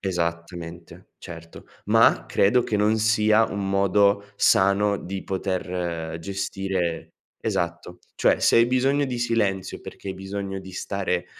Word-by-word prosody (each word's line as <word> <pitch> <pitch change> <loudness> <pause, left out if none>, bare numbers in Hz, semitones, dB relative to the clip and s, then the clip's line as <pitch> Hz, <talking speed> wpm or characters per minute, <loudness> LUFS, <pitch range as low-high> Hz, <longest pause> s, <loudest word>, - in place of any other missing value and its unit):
esattamente, 85 -2 -5
certo, 85 -1 -11 0.2
ma - - +4
credo 120 +5 +3
che 105 - -1
non 105 +2 +2
sia 110 0 +3
un 100 -1 -3
modo 100 +1 +3
sano 100 +1 +3
di 95 +1 -6
poter 90 -4 -3
gestire 95 -2 -3 0.3
esatto. 85 +1 -3 0.2
Cioè, - - +3
se - - +4
hai 115 0 +6
bisogno 135 +3 +2
di 125 -2 -3
silenzio 105 -6 -1
perché 100 - -9
hai 95 - -3
bisogno 95 0 -5
di 95 0 -11
stare, 90 -2 -2
95 Hz, 130 wpm, -24 LUFS, 90-105 Hz, 0.3 s, hai